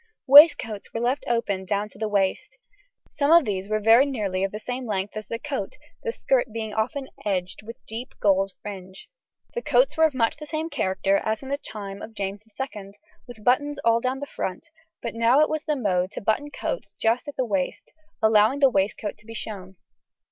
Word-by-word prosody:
Waistcoats 275 -7 +7
were - - 0
left 250 +4 0
open 230 -5 0
well 190 - -10
down 205 +1 0
to 200 - -17
the 220 -1 -1
waist; 195 -2 -1 0.5
some 285 0 0
of 335 -2 +7
these 195 -2 -3
were 215 0 +1
nearly 225 -4 +3
of 195 - -1
the 210 - -5
same 250 +3 -5
length 200 -1 -2
as 215 -2 -6
the 230 - -3
coat, 265 -6 -5 0.2
the 465 - -2
skirt 260 - 0
being 220 -1 -4
often 265 +6 -2 0.2
edged 185 -2 -2
with 230 +2 -9
deep 230 +4 -7
gold 195 -1 +2
fringe. 190 -2 -9 0.5
The 480 - -3
coats - - +3
were 320 -1 +5
of 305 -4 0
much 230 0 +1
the 300 0 -9
same 315 +2 -3
character 195 +1 +1
as 220 +5 -2
in 265 - -8
the 280 - 0
time 200 -5 -7
of 225 - -9
James 200 0 -4 0.2
II, 205 -7 -6 0.3
with 230 -3 -12
buttons 290 +4 +2
all 230 0 +4
down 255 +2 -1
the - - -3
front, 230 - -5 0.3
but 235 - -3
now 230 +4 +4
it 305 - +3
was 310 -1 -2
the 300 - 0
mode 185 -7 0
to - - -5
button 220 +8 0
coats - - -5
just 230 +5 0
at 290 - -6
the 260 - 0
waist, 195 -5 -3 0.3
allowing 220 +4 +5
the 275 -2 +5
waistcoat 205 +1 -1
to 210 - -20
be 225 - -8
shown. 190 -4 -7
220 Hz, 205 wpm, -25 LUFS, 200-265 Hz, 0.5 s, Waistcoats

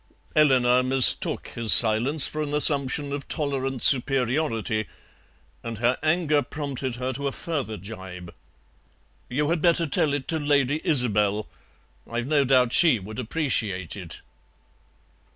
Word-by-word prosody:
Eleanor 125 -4 +3
mistook 130 0 +2
his 115 -2 +3
silence 120 +7 +6
for 155 - -4
an 150 -1 -3
assumption 140 -1 -1
of 140 -1 -6
tolerant 135 -4 -3
superiority, 125 - 0 0.7
and 115 -1 -7
her 120 +3 +1
anger 155 -1 +1
prompted 140 -4 -5
her 130 +1 -4
to 140 +2 -4
a - - -2
further 135 -9 -5
gibe. 95 -3 -10 1.0
"You 145 +5 -1
had 170 -2 -1
better 170 0 +2
tell 145 0 0
it 145 -2 -4
to 160 - -1
Lady 145 -1 0
Isobel. 105 - +1 0.6
I've 120 +1 -4
no 145 0 +1
doubt 125 -2 +2
she 160 -8 +5
would 105 +3 -9
appreciate 110 - -2
it." 90 -6 -7
130 Hz, 135 wpm, -24 LUFS, 115-145 Hz, 1.0 s, silence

